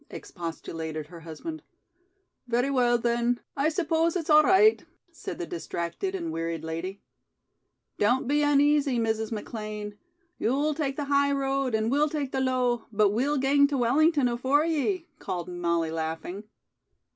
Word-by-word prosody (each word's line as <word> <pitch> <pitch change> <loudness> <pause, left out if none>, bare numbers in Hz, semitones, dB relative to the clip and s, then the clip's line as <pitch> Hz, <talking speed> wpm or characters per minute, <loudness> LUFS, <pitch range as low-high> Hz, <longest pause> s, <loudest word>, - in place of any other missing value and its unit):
expostulated 160 -2 -6
her 170 -1 -10
husband. 170 - -7 0.9
"Very 245 +3 +1
well, 245 -2 +3
then. 235 +1 0 0.2
I 285 +3 +2
suppose 330 0 +1
it's 330 -3 -1
all 305 0 +8
right," 380 +7 +5 0.3
said - - -7
the 350 - -4
distracted 345 - -4
and 335 -3 -3
wearied 165 - -3
lady. 165 +5 -5 1.0
"Don't 245 +5 +2
be 295 +2 +2
uneasy, 290 -2 +3
Mrs. 220 -1 -1
McLean. 210 -1 -6 0.4
You'll 285 +6 +1
tak' 285 -3 -2
the 290 - -3
high 280 0 +2
road 270 -3 0
and 220 +1 0
we'll 295 +2 +3
tak' 290 -3 -3
the 265 - -1
low, 250 -2 0
but 210 -1 +3
we'll 270 +7 +1
gang 280 +1 +4
to 280 -1 -2
Wellington 285 +3 +3
afore 260 +5 +2
ye," 335 +3 0
called 180 -3 -4
Molly 170 -2 -1
laughing. 165 +5 -4
255 Hz, 145 wpm, -27 LUFS, 210-295 Hz, 1.0 s, all